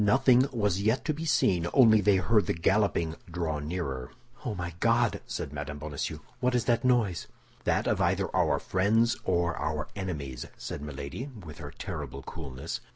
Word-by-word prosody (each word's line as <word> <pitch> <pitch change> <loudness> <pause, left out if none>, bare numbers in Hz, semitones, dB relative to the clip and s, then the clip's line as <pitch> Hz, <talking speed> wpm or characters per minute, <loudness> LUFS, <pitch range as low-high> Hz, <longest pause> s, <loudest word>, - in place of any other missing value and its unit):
Nothing 130 +4 +5
was 105 -6 +1
yet 110 +5 +1
to 155 - +1
be 160 +3 -5
seen, 90 - +2
only 110 -5 +7
they 100 0 +4
heard 100 +1 +3
the - - +1
galloping 85 -2 +1
draw 80 -3 -2
nearer. 75 -5 -3 0.3
"Oh, 120 -7 -2
my 85 -2 -4
God!" 115 +1 +2
said 70 - -4
Mme. 75 0 -5
Bonacieux, 75 -1 -4 0.2
"what 125 0 +1
is 120 -2 +1
that 120 -1 +2
noise?" 110 - +2 0.4
"That - - +2
of - - +1
either - - +1
our - - +3
friends 110 +5 +2
or 85 -2 +1
our 80 -1 -2
enemies," 75 -10 -4
said - - -6
Milady, 75 - -6 0.2
with 75 -2 -9
her 75 -2 -6
terrible 75 -6 -6
coolness. 70 -5 -6
90 Hz, 170 wpm, -29 LUFS, 75-115 Hz, 0.4 s, only